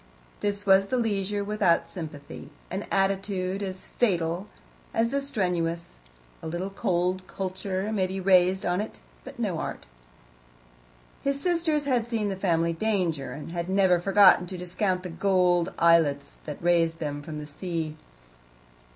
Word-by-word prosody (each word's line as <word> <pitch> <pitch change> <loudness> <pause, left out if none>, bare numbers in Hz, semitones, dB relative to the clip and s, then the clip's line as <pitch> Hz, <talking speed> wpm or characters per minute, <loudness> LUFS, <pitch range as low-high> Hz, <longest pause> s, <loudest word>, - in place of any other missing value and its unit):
His 205 0 -2
was 195 0 +5
the 255 - 0
leisure 205 -3 0
without 200 -5 +2
sympathy 150 -7 -8 0.2
an 190 +3 -4
attitude 195 -1 0
as 190 -2 -5
fatal 175 -4 0 0.5
as 230 +1 +2
the 280 +2 0
strenuous: 175 - -2 0.4
a - - -6
little 175 +4 -3
cold 185 0 0
culture 190 +1 -3
may 195 -4 +1
be 190 +1 -4
raised 185 0 +4
on 180 +2 +1
it, 215 - -7 0.3
but - - -10
no - - -1
art. - - -5 1.4
His 275 0 -1
sisters 330 -3 +1
had 245 -4 +1
seen 220 -3 -1
the 195 - -2
family 170 -3 +1
danger, 165 -9 -1
and 150 +3 -8
had 170 +1 -3
never 190 -2 +4
forgotten 195 -1 +6
to 185 - -6
discount 180 +1 -1
the 180 - -5
gold 180 -1 +2
islets 160 -4 +3
that 150 - -6
raised 165 -1 +3
them 145 -2 -4
from 155 0 -7
the 150 - -6
sea. 160 0 -4
185 Hz, 150 wpm, -27 LUFS, 170-200 Hz, 1.4 s, forgotten